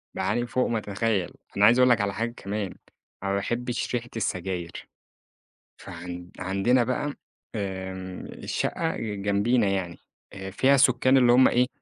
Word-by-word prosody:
باعاني 120 0 0
فوق 125 +1 +1
ما 115 - 0
تتخيّل، 105 -2 -1 0.3
أنا 100 - +6
عايز 120 +4 +6
اقول 125 0 +6
لك 120 -4 +4
على 100 -1 -1
حاجة 115 +4 -2
كمان، 100 -1 -4 0.5
أنا 100 - -1
ما - - +1
باحبش 120 +4 -2
ريحة 120 0 -3
السجاير، 90 -5 -3 0.9
فعن 90 +1 -8
عندنا 100 +7 +2
بقى 135 +4 -2 0.4
آآ، 95 -2 -3 0.5
الشقة 165 -1 -1
ج 105 -3 -4
جنبينا 105 +3 +2
يعني، 95 -3 -2 0.4
أ 95 -1 -6
فيها 135 +8 +3
سُكّان 130 0 +4
اللي 125 -2 +5
هم 130 +1 +7
إيه، 125 +1 +3
105 Hz, 150 wpm, -26 LUFS, 95-120 Hz, 0.9 s, هم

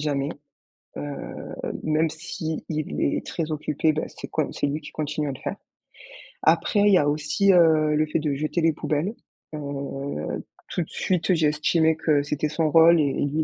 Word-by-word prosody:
jamais. 145 -2 -1 0.7
Heu, - - -4 0.8
même 155 +1 +2
s'il 160 0 -5
est 155 -2 -1
très 165 -2 -3
occupé, 155 +1 0
ben, 155 - -2
c'est - - -9
quan - - -1
c'est - - -1
lui 145 +2 -2
qui 150 - -10
continue 150 -1 -2
à - - -2
le 130 - -10
faire. - - -4 0.9
Après, 165 +5 +3
il 205 - +5
y - - +7
a 145 -3 +3
aussi, 155 +7 +2
heu, 155 -3 +5
le 155 - +3
fait 155 +1 -1
de 150 -2 -1
jeter 155 +4 -1
les 165 -1 +3
poubelles. 155 +10 -2 0.4
Heu, 140 - -4 0.3
tout 175 - -1
de - - -14
suite 185 0 0
j'ai 160 -3 +3
estimé 160 +2 +2
que 155 -2 +2
c'était 150 +1 -1
son 155 0 0
rôle 165 +1 +7
et 140 -3 +2
lui 145 +2 -1
il - - +3
155 Hz, 190 wpm, -25 LUFS, 150-160 Hz, 0.9 s, y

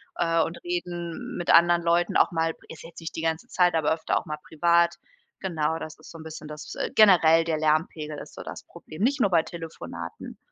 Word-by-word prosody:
äh, 165 -1 +2
und 165 - -6
reden 175 -1 -4
mit 175 - -4
anderen 175 0 +6
Leuten 170 +1 +1
auch - - +4
mal, 165 0 0 0.2
ist 160 - -10
jetzt 165 0 -12
nicht 165 - -7
die 160 - -2
ganze 165 +8 -2
Zeit, 180 -5 +2
aber 160 -2 +1
öfter 160 - -1
auch - - -3
mal 150 -2 -4
privat. 170 +1 +3 0.5
Genau, 160 -4 -1
das 155 - -8
ist - - -13
so 165 - -10
'n - - -9
bisschen 155 -1 -9
das 150 0 -8
äh, - - -2
generell 165 -6 +6
der 160 -1 -1
Lärmpegel 155 0 0
ist - - -11
so - - -8
das - - -8
Problem, 155 - -12
nicht 275 +5 +2
nur 205 - +3
bei 165 - +5
Telefonaten. 85 - -8
165 Hz, 215 wpm, -26 LUFS, 155-175 Hz, 0.5 s, anderen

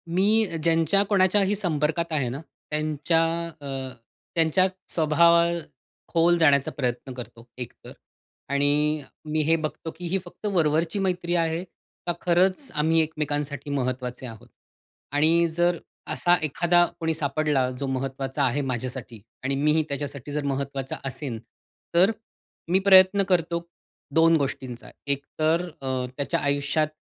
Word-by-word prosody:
मी 215 +4 +4 0.2
ज्यांच्या 165 +4 +3
कोणाच्याही 195 0 +3
संपर्कात 165 -3 -1
आहे 140 -5 +1
ना, 130 +4 -5 0.3
त्यांच्या 155 +1 +1 0.4
अ, 140 - -7 0.7
त्यांच्या 165 +3 +3 0.3
स्वभावात 170 +2 +4 0.5
खोल 170 +1 +3
जाण्याचा 145 -4 +4
प्रयत्न 125 -1 -3
करतो 120 -1 -10
एक 125 -2 -6
तर, - - -9 0.6
आणि 145 +2 +2 0.3
मी 155 +1 +1
हे 165 +2 +3
बघतो 160 0 -4
की 175 +1 -6
ही 190 +3 +1
फक्त - - -12
वरवरची 165 +1 +1
मैत्री 180 -2 0
आहे. 165 0 0 0.4
का 175 - +2
खरंच 185 +9 +2
आम्ही 160 +2 +2
एकमेकांसाठी 150 -2 -3
महत्त्वाचे 130 -2 -3
आहोत? 115 -3 -10 0.6
आणि 160 +4 +4
जर 175 0 +2 0.4
असा 175 0 +3
एखादा 175 +4 +3
कोणी 160 -1 0
सापडला 145 -3 0
जो 140 - -2
महत्त्वाचा 135 +1 -2
आहे 135 +2 +1
माझ्यासाठी 125 -2 -4 0.2
आणि 135 +1 0
मीही 150 +3 +2
त्याच्यासाठी 140 -1 -5
जर 150 0 -2
महत्त्वाचा 140 -1 -3
असेन, 130 -3 -4 0.6
तर 185 +5 +6 0.6
मी 185 - +5
प्रयत्न 190 +1 +7
करतो 170 -1 +1 0.5
दोन 165 0 +6
गोष्टींचा. 130 -4 -4 0.2
एक 140 0 0
तर 165 +3 +2
अ, 130 -1 -2
त्याच्या 150 +4 0
आयुष्यात 145 +1 +1
155 Hz, 130 wpm, -25 LUFS, 140-170 Hz, 0.7 s, प्रयत्न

